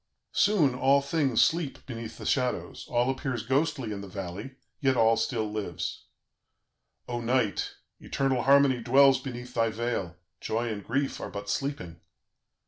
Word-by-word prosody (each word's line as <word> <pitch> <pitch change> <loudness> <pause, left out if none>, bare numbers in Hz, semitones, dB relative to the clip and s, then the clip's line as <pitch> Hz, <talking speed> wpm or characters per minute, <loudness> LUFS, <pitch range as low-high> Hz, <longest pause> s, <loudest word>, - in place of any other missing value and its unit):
"Soon 185 -11 +3
all 135 +2 +4
things 140 -4 +2
sleep 165 -4 -1
beneath 115 -3 -7
the - - -9
shadows, 125 -2 -1
all 120 0 +2
appears 130 -3 -3
ghostly 135 -3 0
in 100 -1 -4
the 100 - -8
valley; 95 +6 -6 0.2
yet 135 -3 +2
all 115 0 +5
still 115 0 -1
lives. 105 -6 -4 1.0
"O 120 -1 -3
Night! 120 -3 0 0.2
Eternal 135 -2 0
Harmony 135 -1 +5
dwells 135 +3 +5
beneath 125 -2 -7
thy 115 -1 +2
veil; 110 -6 -3 0.2
joy 115 +2 -2
and 105 -2 -4
grief 135 +3 -1
are - - -5
but 100 0 -5
sleeping. 90 - -3
125 Hz, 145 wpm, -28 LUFS, 110-135 Hz, 1.0 s, all